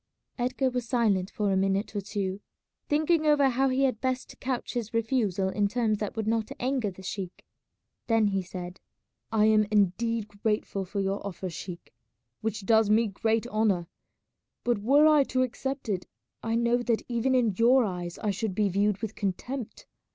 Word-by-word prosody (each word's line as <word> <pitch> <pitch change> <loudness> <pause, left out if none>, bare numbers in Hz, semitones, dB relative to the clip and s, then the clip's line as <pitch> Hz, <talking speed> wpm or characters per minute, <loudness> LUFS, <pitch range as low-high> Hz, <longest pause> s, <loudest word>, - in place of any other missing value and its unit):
Edgar 255 +2 0
was 245 -2 -3
silent 210 -7 +2
for 210 -3 -1
a - - +2
minute 195 +3 0
or 205 - 0
two, 200 -1 -3 0.5
thinking 310 +1 +2
over 290 -2 +5
how 265 +2 +2
he 260 +1 +1
had 255 -5 +1
best 260 0 -3
couch 255 -2 -3
his 230 -2 -4
refusal 215 -5 +1
in 205 +1 +1
terms 215 -1 0
that 210 - -3
would 220 -1 -2
not 225 0 0
anger 255 -4 0
the 190 0 -12
sheik. 190 -1 -6 0.6
Then 225 -3 +3
he 195 -1 0
said, 180 0 -7 0.5
"I 215 -1 +4
am 215 -1 +4
indeed 215 +2 +1
grateful 210 -3 -1
for 200 +2 -4
your 195 +1 -1
offer, 190 -2 -5
sheik, 170 +2 -8 0.5
which 220 -2 -3
does 220 0 +4
me 220 +1 +4
great 220 +3 0
honour, 215 -6 +1 0.8
but 240 -3 +1
were 275 +8 +5
I 305 -2 +6
to 255 0 +1
accept 265 +2 -4
it 190 -4 -2 0.3
I 225 0 -1
know 235 +1 +3
that 240 -2 0
even 245 +2 +1
in 235 -5 +3
your 245 +5 +5
eyes 175 -3 -4
I 210 - -1
should 195 0 -3
be 210 -1 +2
viewed 200 +2 +1
with 220 -1 -3
contempt. 220 +5 -4
220 Hz, 180 wpm, -28 LUFS, 195-245 Hz, 0.8 s, I